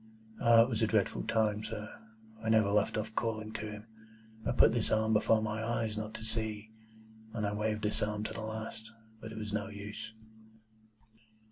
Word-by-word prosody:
"Ah! 115 -1 +8
it - - 0
was 115 -2 -1
a 110 - +4
dreadful 105 -2 +1
time, 110 -1 +1
sir. 110 -1 -5 0.6
I 110 - 0
never 110 -2 +4
left 105 +1 +2
off 110 +1 -3
calling 110 -1 -2
to 110 - -4
him. 105 +1 -8 0.6
I - - +2
put - - +6
this 115 -1 0
arm 110 0 +2
before 110 +1 +4
my 110 0 -2
eyes 115 -1 -1
not 110 0 -4
to 110 - -7
see, 110 -1 -3 0.6
and 110 -2 -1
I 100 - 0
waved 105 0 -1
this 105 - 0
arm 105 0 -1
to - - -4
the 115 - -5
last; 110 0 -6 0.3
but 110 - -8
it 110 - -8
was 105 -1 -4
no 110 0 -1
use." 105 +1 -7
110 Hz, 195 wpm, -33 LUFS, 105-110 Hz, 0.6 s, Ah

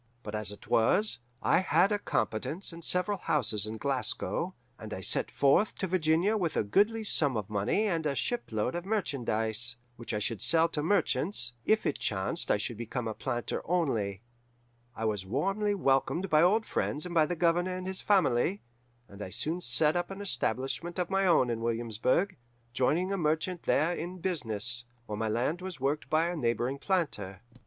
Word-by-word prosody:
But 105 - -7
as 105 -1 -2
it 105 - -12
was, 200 - +3 0.2
I - - +4
had 190 +1 +3
a 205 - +1
competence 165 - -2
and 165 0 -10
several 185 +4 0
houses 110 - +1
in 110 +1 -5
Glasgow, 130 -3 -1 0.2
and - - -6
I - - -6
set - - 0
forth 140 +10 +3
to - - -2
Virginia 180 +3 +2
with 175 -6 -1
a - - +3
goodly 210 - +2
sum 145 - +2
of 105 -1 -5
money 105 - +1
and 165 -6 0
a 140 - -1
shipload 125 - -1
of 175 - -3
merchandise, 120 - -1 0.2
which 120 - -6
I - - +1
should 110 0 -2
sell 165 0 +4
to 150 - -2
merchants, 165 - 0
if 220 0 +2
it - - -1
chanced 95 -2 -1
I - - +4
should 110 +2 -3
become 120 +1 -4
a 110 - -2
planter 120 0 -3
only. 115 - -1 0.7
I 115 - -3
was 105 -3 -1
warmly 195 - 0
welcomed 170 +3 +1
by 155 0 +6
old 210 +6 +4
friends 150 +4 -1
and 180 - -5
by 160 -2 +4
the 175 - -2
Governor 175 +2 +1
and 185 - -6
his 190 0 -4
family, 185 -2 +2 0.4
and 100 +1 -12
I 95 - -5
soon 160 - -3
set 150 +4 +3
up 175 0 -1
an 195 0 -7
establishment 170 - -1
of 180 0 -2
my 195 0 +2
own 130 -8 +4
in 115 -1 -3
Williamsburg, 115 - 0 0.4
joining 150 - +1
with - - -1
a - - 0
merchant 160 +2 0
there 160 +5 +3
in 175 +2 -5
business, 120 - -1 0.2
while 105 -2 -5
my 110 0 -1
land 130 +11 0
was 185 -5 -6
worked 140 +3 -1
by 160 +1 +3
a 175 - -2
neighbouring 125 -1 -1
planter. 105 - -1
150 Hz, 190 wpm, -30 LUFS, 115-180 Hz, 0.7 s, by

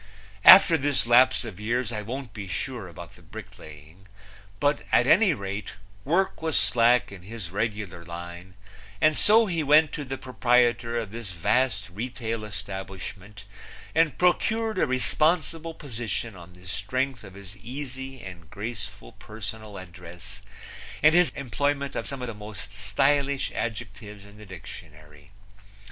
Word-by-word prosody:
After 170 -4 +10
this 140 -2 +2
lapse 125 +1 +5
of 105 -5 -8
years 120 +2 -1
I 105 -2 -3
won't 120 +1 -6
be 105 -2 -7
sure 115 +2 -4
about 85 - -11
the - - -19
bricklaying, 80 +6 -13 0.5
but 145 +4 +1
at 125 - +5
any 180 - +5
rate, 100 -1 -5 0.3
work 175 - 0
was 160 -2 +1
slack 120 0 +3
in 100 -2 -10
his 100 -2 -8
regular 105 -4 -3
line, 85 +2 -9 0.4
and 155 +5 +4
so 225 +7 +6
he 170 -5 -1
went 150 +1 +5
to 150 - -4
the 135 -1 -5
proprietor 120 -2 +2
of 110 -4 -4
this 110 -4 -6
vast 110 +3 0
retail 115 +1 -4
establishment 95 0 -8 0.5
and 160 -2 +2
procured 220 +5 +1
a - - +2
responsible 160 +6 0
position 115 -5 -5
on 90 0 -13
the 90 +1 -17
strength 125 +8 -2
of 95 -2 -12
his 100 0 -11
easy 130 +3 -7
and 85 -4 -10
graceful 100 - -7
personal 110 -1 -8
address 90 -2 -11 0.6
and 155 +1 +7
his 175 0 +5
employment 140 +1 -2
of - - -3
some 135 -3 -5
of - - -3
the 115 - -5
most 105 -1 -9
stylish 135 +7 +1
adjectives 105 -2 -6
in 100 +1 -16
the 105 - -12
dictionary. 75 -4 -12
110 Hz, 145 wpm, -26 LUFS, 100-135 Hz, 0.6 s, After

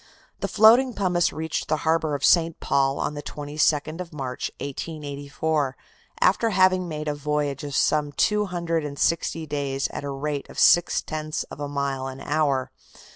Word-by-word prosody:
The - - -2
floating 235 +3 +5
pumice 180 -3 +1
reached 160 0 -3
the 155 - +1
harbor 160 -2 +1
of 140 - -1
St. 165 -2 +4
Paul 135 0 +1
on - - -2
the 145 - -5
22nd 150 +2 -1
of 180 -1 -8
March, 130 -4 -4
1884, 145 0 -3 0.4
after 230 - +3
having 185 -2 +3
made 155 -2 -5
a 150 - 0
voyage 145 -1 -2
of 145 -2 -5
some 150 -1 +2
two 210 +8 +2
hundred 170 -3 -2
and 145 -1 -6
sixty 165 0 0
days 140 -2 -2
at - - -6
a 140 - -4
rate 140 +1 -4
of - - -12
six 175 - +4
tenths 155 -1 -3
of - - -9
a 145 - -3
mile 140 -2 -2
an 135 0 -7
hour. 145 -3 0
150 Hz, 175 wpm, -24 LUFS, 140-165 Hz, 0.4 s, floating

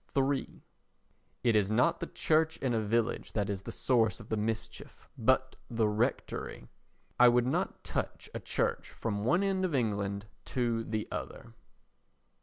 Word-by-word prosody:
iii 135 0 0 0.8
It 120 -3 +4
is 105 -2 +3
not 125 +10 +3
the 170 - -3
church 160 0 +2
in 130 -3 0
a 110 - +2
village 115 +2 0
that 105 -2 0
is 95 -1 -3
the - - -7
source 115 -6 +2
of 115 - -12
the - - +1
mischief, 110 +1 -4
but - - +2
the 115 -2 +2
rectory. 110 +5 -2 0.5
I 125 - +9
would 120 0 +4
not 130 - -1
touch - - -3
a - - -3
church - - -1
from 105 -3 -3
one 175 - +3
end 190 -1 +1
of 175 -6 0
England 100 -4 0 0.2
to 120 -3 0
the 110 -1 -2
other. 115 0 -6
115 Hz, 160 wpm, -31 LUFS, 105-130 Hz, 0.8 s, I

